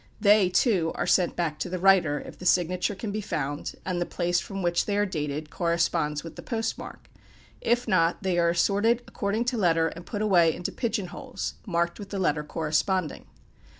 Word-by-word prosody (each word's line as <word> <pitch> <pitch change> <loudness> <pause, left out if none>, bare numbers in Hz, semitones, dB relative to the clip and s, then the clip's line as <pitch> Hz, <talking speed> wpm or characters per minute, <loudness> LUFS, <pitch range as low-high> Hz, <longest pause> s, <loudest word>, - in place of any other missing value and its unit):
They, 205 -2 +5
too, 180 -4 +2
are - - -1
sent 180 0 +2
back 160 -3 -2
to - - -3
the 185 - -2
writer, 180 -6 +4
if - - -11
the 180 - -8
signature 180 +3 +2
can 205 +2 -5
be 215 +1 -3
found, 145 -6 -3
and 180 -2 -2
the - - +1
place 175 0 0
from 195 0 -5
which 175 0 +1
they 205 -1 0
are 205 - +3
dated 150 -4 -4
corresponds 170 -3 0
with 165 - -9
the - - -8
post 225 -1 -2
mark; - - -10 0.5
if 240 +1 +1
not, 170 +1 +2
they 180 -2 +1
are 170 0 +3
assorted 205 +7 +2
according 215 +2 -2
to 245 0 -1
letter 165 -3 +3
and 170 +1 -11
put 210 -1 -3
away 175 -6 +4
into 180 - -4
"pigeon 215 -6 -2
holes," - - -5
marked 170 -2 0
with 200 -1 -8
the 200 - -4
letter 150 -5 +1
corresponding. 160 +2 -1
180 Hz, 200 wpm, -26 LUFS, 165-200 Hz, 0.5 s, They